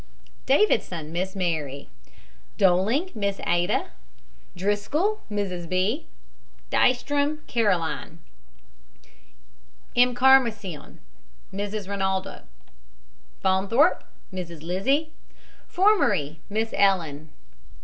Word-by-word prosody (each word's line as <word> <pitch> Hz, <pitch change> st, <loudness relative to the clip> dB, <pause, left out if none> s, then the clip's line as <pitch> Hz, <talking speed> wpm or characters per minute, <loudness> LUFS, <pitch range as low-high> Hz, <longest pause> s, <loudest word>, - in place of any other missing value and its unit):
DAVIDSON, 200 Hz, -, +2 dB
MISS 185 Hz, +3 st, -3 dB
MARY. 155 Hz, -7 st, -2 dB, 0.7 s
DOLING, 205 Hz, -, +2 dB
MISS 200 Hz, -2 st, -2 dB
ADA. 175 Hz, 0 st, 0 dB, 0.6 s
DRISCOLL, 210 Hz, -, 0 dB
MRS. 185 Hz, -5 st, -3 dB
B. 195 Hz, -, 0 dB, 0.6 s
DEYSTROM, 285 Hz, +4 st, +1 dB
CAROLINE. 180 Hz, -7 st, -1 dB, 1.8 s
EMCARMACION, 245 Hz, -, +3 dB, 0.5 s
MRS. 205 Hz, 0 st, -4 dB
RINALDO. 190 Hz, -1 st, -2 dB, 1.0 s
FAUNTHORPE, 200 Hz, -, +3 dB, 0.3 s
MRS. 170 Hz, -4 st, -7 dB
LIZZIE 265 Hz, -, 0 dB, 0.6 s
FORMERY, 205 Hz, -, +2 dB
MISS 220 Hz, +2 st, -2 dB
ELLEN. 165 Hz, -7 st, +1 dB
200 Hz, 65 wpm, -25 LUFS, 175-250 Hz, 1.8 s, EMCARMACION